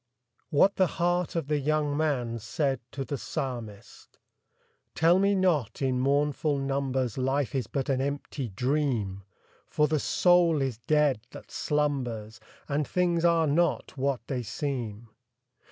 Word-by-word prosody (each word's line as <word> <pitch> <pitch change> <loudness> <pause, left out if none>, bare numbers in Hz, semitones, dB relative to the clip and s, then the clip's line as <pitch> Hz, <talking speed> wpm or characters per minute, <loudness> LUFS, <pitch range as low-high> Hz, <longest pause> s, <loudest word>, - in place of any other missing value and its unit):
■WHAT 190 +7 +4
THE 185 - +4
HEART 175 +1 0
OF 165 -4 -1
THE 150 0 +1
YOUNG 150 0 0
MAN 130 -7 0
SAID 135 +4 -1
TO 135 -1 -4
THE 140 -1 -4
PSALMIST. 115 -7 -6 0.8
Tell 170 +3 +4
me 200 +1 +3
not, 175 - +1
in 130 -2 0
mournful 145 +2 +1
numbers, 135 -3 -1
Life 135 -1 0
is 130 -5 -1
but 135 0 -2
an 130 -1 +1
empty 140 -2 -3
dream! 120 -4 -1 0.5
For 150 - +2
the 155 0 +1
soul 175 0 +3
is 130 -5 -2
dead 150 -5 +3
that - - -12
slumbers. 125 -7 -2 0.3
And 145 0 -1
things 175 -2 +1
are 170 -1 +4
not 155 +2 +1
what 135 -1 -1
they 130 0 -2
seem. 120 -4 -4
140 Hz, 140 wpm, -28 LUFS, 125-155 Hz, 0.8 s, ■WHAT